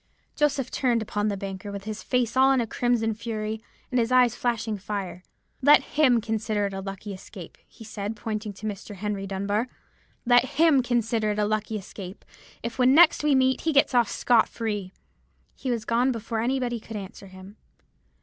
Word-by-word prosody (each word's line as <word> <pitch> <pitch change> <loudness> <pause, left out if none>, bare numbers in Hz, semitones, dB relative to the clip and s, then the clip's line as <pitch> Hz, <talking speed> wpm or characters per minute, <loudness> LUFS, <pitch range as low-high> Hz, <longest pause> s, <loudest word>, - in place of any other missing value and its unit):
"Joseph 280 -4 0
turned 240 -4 +1
upon 210 0 -2
the 200 -1 -1
banker, 195 0 -6
with 200 -1 -6
his 215 0 -5
face 250 -2 0
all 265 +1 +5
in 265 - +3
a 235 - +1
crimson 225 -1 0
flame, 220 0 -4 0.3
and 250 - +2
his 230 +1 0
eyes 250 -2 +5
flashing 225 -3 -2
fire. 195 -2 -5 0.4
'Let 290 +3 +6
him 265 -6 +3
consider 215 -1 -1
it 200 - -4
a 195 - -4
lucky 195 +1 -6
escape,' 185 - -11
he 225 - -14
said, 210 0 -5
pointing 215 0 -4
to 200 +2 -10
Mr. 205 0 -6
Henry 200 0 -3
Dunbar,—'let 215 +4 -1
him 315 -4 +5
consider 230 -3 0
it - - -7
a 210 - +2
lucky 215 +1 -1
escape, 190 -1 -9 0.4
if 235 +2 -5
when 250 0 +5
we 265 - +5
next 325 -2 +6
meet 260 -3 +3
he 325 - 0
gets 280 -1 +4
off 240 -3 +3
scot 235 -3 +3
free.' 210 -5 -4 0.6
"He 265 - -5
was 230 -3 -1
gone 240 +3 +2
before 230 -1 -3
any 255 +4 0
body 240 -2 -2
could 225 0 -10
answer 195 0 -9
him. 190 +2 -13
225 Hz, 190 wpm, -26 LUFS, 205-245 Hz, 0.6 s, Let